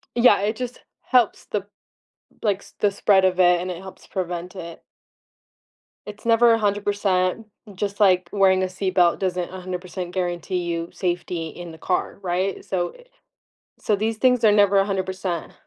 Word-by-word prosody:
Yeah, 235 -4 +5
it 215 +2 -1
just 250 -1 -5 0.2
helps 245 -4 +2
the 205 -1 -3 0.8
like, 200 -3 +1
s - - -17
the 205 -1 +3
spread 195 -1 +3
of 185 0 +1
it, 180 -1 +5
and 185 - -4
it 170 - -5
helps 190 -1 -12
prevent 180 -1 -4
it. 170 -3 -9 1.2
It's 210 +1 -10
never 230 0 +5
100%, 205 -1 0 0.3
just 200 +2 -4
like 185 -3 +4
wearing 190 -2 +4
a 185 - +2
seatbelt 185 -2 +1
doesn't 180 -1 -2
100% 180 -1 -6
guarantee 180 0 -2
you 170 -1 -3
safety 175 -2 -2
in 175 +1 -9
the 160 - -13
car, 180 - -2
right, 185 +1 -2
so, 175 -2 -1
eh - - -17 0.8
so, 215 - +1
these 220 +2 -1
things 250 -1 +3
are 215 - +7
never 205 -1 +4
100%. 190 -3 -2
190 Hz, 155 wpm, -23 LUFS, 180-205 Hz, 1.2 s, are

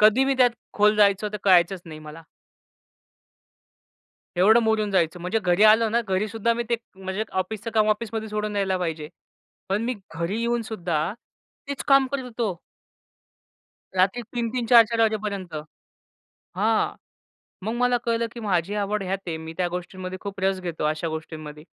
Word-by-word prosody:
कधी 220 +5 +6
मी 270 0 +2
त्यात 250 -1 +6 0.2
खोल 210 +1 +4
जायचो, 205 0 +4
तर 210 - -5
कळायचंच 185 -1 +4
नाही 155 -2 -9
मला. 155 +2 -10 2.1
एवढं 220 +6 +6
मुरून 220 -2 +1
जायचं. 175 -2 +1
म्हणजे 180 +6 0
घरी 180 +3 +2
आलो 220 +1 +6
ना 235 +2 +2
घरीसुद्धा 215 +3 0
मी 235 - -1
ते 235 - +3 0.2
म्हणजे 190 +3 -3
ऑफिसच 210 +4 -3
काम 215 -1 +4
ऑफिसमध्ये 220 0 -2
सोडून 210 0 -3
यायला 190 -2 +1
पाहिजे. 160 -3 -3 0.6
पण 200 +3 0
मी 250 - -1 0.2
घरी 170 +7 -2
येऊन 235 0 0
सुद्धा 175 -6 -2 0.6
तेच 280 - -3
काम 275 -1 +6
करत 280 -1 -2
होतो. 225 -7 -3 1.4
रात्री 190 +6 +2
3-3 235 +1 -3
4-4 230 -1 +6
वाजेपर्यंत. 205 -6 -1 1.0
हां. 220 +3 +1 0.7
मग 220 +2 -2
मला 245 0 +2
कळलं 230 0 +1
की 235 - -7
माझी 195 -2 0
आवड 205 0 -1
हयात 190 +1 -2
आहे 165 -2 -2
मी 160 0 -7
त्या 180 -1 +1
गोष्टींमध्ये 185 +1 -6
खूप 200 -1 -6
रस 190 0 +1
घेतो 170 -4 -4
अशा 155 +2 0
गोष्टींमध्ये. 155 -1 -7
205 Hz, 155 wpm, -24 LUFS, 180-225 Hz, 2.1 s, कधी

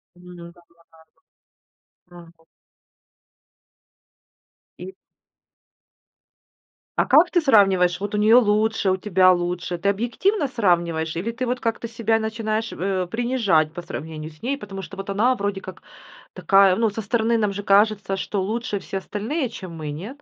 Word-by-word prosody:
Мгм. 180 0 -14 1.5
Да-да-да. 175 -1 -17
Мгм. 165 0 -29 2.3
И 380 - -9 2.0
А - - +3
как 345 +3 +5
ты 355 - +3
сравниваешь: 195 - +3
вот 205 +1 -4
у - - 0
нее 215 +3 +5
лучше, 215 -3 +2
у 185 - 0
тебя 185 -1 +4
лучше? 175 0 -2
Ты 200 +4 0
объективно 245 - 0
сравниваешь, 170 -9 0
или 205 +8 -3
ты 250 +2 -4
вот 250 +1 -2
как-то 230 0 -3
себя 225 -1 0
начинаешь, 220 0 -3
э, 185 -1 -2
принижать, 225 -10 +1
по 175 - -6
сравнению 155 -2 -7
с 150 - -22
ней? 275 +3 -1
Потому 195 -6 -8
что 195 - -10
вот 195 +1 -7
она, 225 +6 +2
вроде 200 -2 -3
как, 185 - -10 0.5
такая, 195 -2 +4
ну, 225 +2 +1
со 215 +2 -5
стороны 230 +2 0
нам 210 -2 0
же 205 +1 -6
кажется, 200 -1 +2
что 195 0 -3
лучше 215 +1 -3
все 195 - -6
остальные, 225 - -3
чем 185 -6 -9
мы, 155 -2 -5
нет? 220 - -8
200 Hz, 150 wpm, -22 LUFS, 180-230 Hz, 2.3 s, как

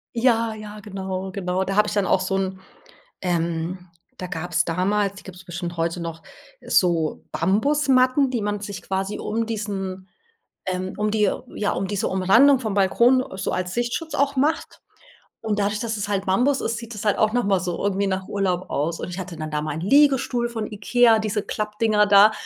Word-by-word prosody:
Ja, 230 -2 +2
ja, 215 -1 -9
genau, 190 -2 -5
genau. 185 -1 -1
Da 195 0 -3
habe 210 0 +5
ich 210 - -3
dann 205 -2 +1
auch 190 - +3
so 185 +1 -1
'n 190 0 -2 0.6
ähm, 170 +1 -2 0.3
da 185 - -5
gab's 175 +1 -1
damals- 195 +4 0
die 200 - -12
gibt's 185 -1 -11
bestimmt 175 -1 -5
heute 170 +1 -1
noch- 165 -1 -6 0.4
so 170 -4 +1
Bambusmatten, 255 - +3
die 245 -3 -1
man 205 0 -2
sich 200 -2 -6
quasi 195 +1 -3
um 225 +1 -2
diesen 195 -4 -4 0.6
ähm, 185 0 -3
um 210 0 0
die 210 -2 +3 0.3
ja, 205 - 0
um 195 - -2
diese 200 -1 -1
Umrandung 230 +9 +5
vom 220 -5 -3
Balkon 235 +6 +4
so - - -2
als 185 0 -2
Sichtschutz 240 +7 -2
auch 280 0 +1
macht. 300 +5 0 0.6
Und 210 -1 -1
dadurch, 205 +1 0
dass 225 -1 -2
es 205 - -3
halt 200 -1 -1
Bambus 250 +9 +2
ist, 230 - -2
sieht 230 0 -8
das 210 - -6
halt 205 -2 +2
auch 215 0 +3
noch 245 - +2
mal 195 -3 +2
so 180 -1 -3
irgendwie 200 0 0
nach 190 -1 -2
Urlaub 185 -3 -1
aus. 165 +3 -1
Und - - -4
ich 180 - -6
hatte 180 -3 -6
dann 155 0 -5
da 150 -1 -1
meinen 155 0 -4
Liegestuhl 255 - +3
von 225 -3 -4
Ikea, 225 +2 +4
diese 215 -1 -1
Klappdinger 210 0 +1
da, 205 +1 +7
200 Hz, 190 wpm, -23 LUFS, 185-225 Hz, 0.6 s, da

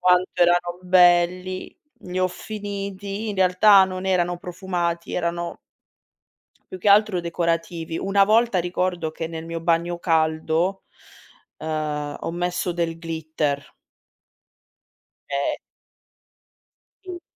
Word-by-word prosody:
Quanto 180 0 +3
erano 175 0 +2
belli. 180 0 +3 0.2
Li 180 0 -5
ho 185 - +2
finiti, 200 +1 -5
in 200 - -5
realtà 190 +2 +6
non 185 0 -5
erano 175 -2 +1
profumati 175 -1 -3
erano 170 0 -2 1.1
più 185 - -7
che 205 - -3
altro 200 -2 +5
decorativi. 165 -1 -2
Una 195 0 +3
volta 225 0 +3
ricordo 175 -2 -1
che 160 +1 -5
nel 160 -1 -6
mio 165 0 -4
bagno 170 +1 0
caldo, 160 +3 +1 0.7
uhm, 150 -2 -3
ho - - -3
messo 180 +1 -2
del 170 -1 -2
glitter. 160 -3 -3 1.6
Ehm 140 0 -1 1.5
Sì. 360 -2 -7
175 Hz, 105 wpm, -23 LUFS, 165-185 Hz, 1.6 s, realtà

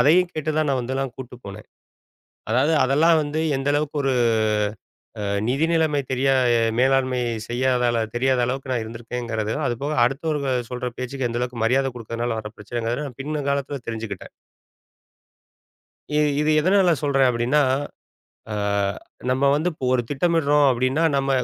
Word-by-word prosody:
அதையும் 175 +6 +4
கேட்டுதான், 155 0 -1
நான் 130 -2 +1
வந்து 130 +2 -3
நான் 135 -2 -4
கூட்டு 125 -1 -8
போனேன். 100 +1 -9 0.9
அதாவது 135 +7 +3
அதெல்லாம் 155 +5 +4
வந்து, 150 +2 -2 0.2
எந்த 135 +1 -1
அளவுக்கு, 150 0 -1
ஒரு 135 -1 +2 1.1
அ - - -3 0.3
நிதி 140 +6 +2
நிலமை 160 -3 +2
தெரியா 135 +1 +2 0.2
அ - - +3 0.2
மேலாண்மை 130 0 +2 0.3
செய்யாதால 125 -1 +1 0.2
தெரியாத 130 +1 +2
அளவுக்கு 130 +2 -4
நான் 120 - 0
இருந்திருக்கேன்கறது. 115 -1 -4
அதுபோக, 135 +5 -2
அடுத்தவர்கள் 135 -2 -1
சொல்ற 125 0 -3
பேச்சுக்கு, 130 0 -3
எந்தளவுக்கு 120 -1 -3
மரியாதை 135 +3 +2
குடுக்கதனால 115 0 -3
வர்ற 105 -1 -8
பிரச்சனைதான்னு, 120 +5 -4
பின்னங்காலத்துல 140 -1 -2
தெரிஞ்சுகிட்டேன். 110 -4 -5 1.8
இது 150 0 +3 0.2
இது 150 +1 +2
எதனால 185 +1 +4
சொல்றேன் 135 -2 +3
அப்படின்னா, 125 +5 +1 0.9
அ - - -2 0.8
நம்ம 130 +2 +1
வந்து 155 +4 +1
இப்ப 145 - -7
ஒரு 125 - +2
திட்டமிடுறோம் 150 -1 +2
அப்படின்னா, 130 +5 +1
நம்ம 135 0 0
130 Hz, 135 wpm, -23 LUFS, 120-145 Hz, 1.8 s, அதையும்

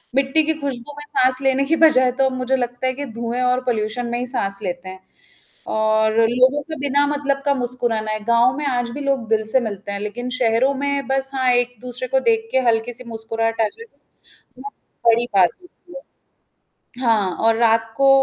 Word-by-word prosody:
मिट्टी 275 +3 +2
की 320 +1 0
खुशबू 275 0 -5
में 295 - -8
साँस 255 0 +1
लेने 270 0 +2
की 325 +3 +2
बजाय 255 -4 +4
तो 270 - +4
अब 265 - +1
मुझे 255 +1 0
लगता 245 0 -2
है 255 - 0
कि 285 +2 -5
धुएँ 235 +2 -3
और 250 0 +2
पॉल्यूशन 230 0 -1
में 240 +1 -2
ही 250 - -2
साँस 200 -6 -2
लेते 180 0 -5
हैं 190 0 -10 0.8
और 220 0 +2
लोगों 260 +4 +3
का 315 +2 -7
बिना 285 +1 +2
मतलब 285 -1 -1
का 280 - +3
मुस्कुराना 240 -4 -2
है। 215 - -3
गाँव 235 +3 +3
में 300 - -3
आज 245 -2 -1
भी 290 - -6
लोग 275 -5 -1
दिल 220 -1 +1
से 260 - +4
मिलते 205 -3 -5
हैं 200 - -4
लेकिन 245 +4 -5
शहरों 245 +4 +2
में 280 0 -2
बस 270 0 -1
हाँ 260 -1 +2
एक-दूसरे 245 +1 -2
को 265 +1 +2
देख 450 0 0
के 260 - +3
हल्की-सी 235 +2 -1
मुस्कुराहट 225 0 -2
आ 220 - +4
जाए 460 - -13 0.7
वो 280 +2 -7 0.4
बड़ी 235 +1 +4
बात 185 -3 +6
होती 355 0 -20 1.1
है। - - -1
हाँ, 200 -6 +2
और 225 0 +3
रात 225 -1 +2
को 275 0 +4
245 Hz, 200 wpm, -20 LUFS, 225-270 Hz, 1.1 s, बात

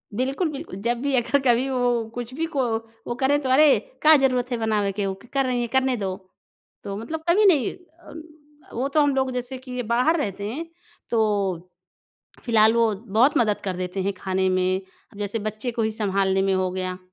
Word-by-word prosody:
बिल्कुल, 270 - 0
बिल 300 +3 -6 0.2
जब 235 +1 +1
भी 280 0 -1
अगर 255 +3 +2
कभी 245 +3 +3
वो 245 -3 0
कुछ 245 0 -6
भी 320 +4 -2
को 270 - +2 0.4
वो 240 - -2
करें 275 +3 +2
तो 260 - -3
अरे! 285 +2 +6 0.2
का 310 +1 +8
ज़रूरत 255 -2 +1
है 240 - 0
बनावे 215 -3 0
के 200 +1 -2
वो 195 - -1 0.2
कर 275 -1 +2
रही 250 -1 0
हैं 240 - -2
करने 265 -1 +2
दो। 190 -2 -3 0.7
तो 200 -1 -4
मतलब 310 +10 -5
कभी 390 +5 +4
नहीं 305 -10 +3
अन 340 -2 -14 0.5
अ, - - -13
वो 255 +4 -1
तो 300 +2 +2
हम 285 -1 +2
लोग 265 -1 +1
जैसे 250 +1 -4
कि 255 0 -11
ये 250 0 -2
बाहर 250 +9 +2
रहते 200 -5 -3
हैं, 285 +10 -4 0.5
तो 200 -6 0 0.8
फिलहाल 220 -2 +5
वो 230 -2 +3
बहुत 225 +6 +2
मदद 215 -3 +2
कर 190 -2 -2
देते 185 +1 -3
हैं, 200 +1 -1
खाने 190 0 -1
में, 185 0 +1 0.4
जैसे 205 +2 -3
बच्चे 215 +4 -5
को 230 0 -2
ही 220 0 0
सँभालने 195 -3 0
में 195 0 +1
हो 185 -1 +1
गया। 185 0 -3
235 Hz, 205 wpm, -24 LUFS, 200-265 Hz, 0.8 s, का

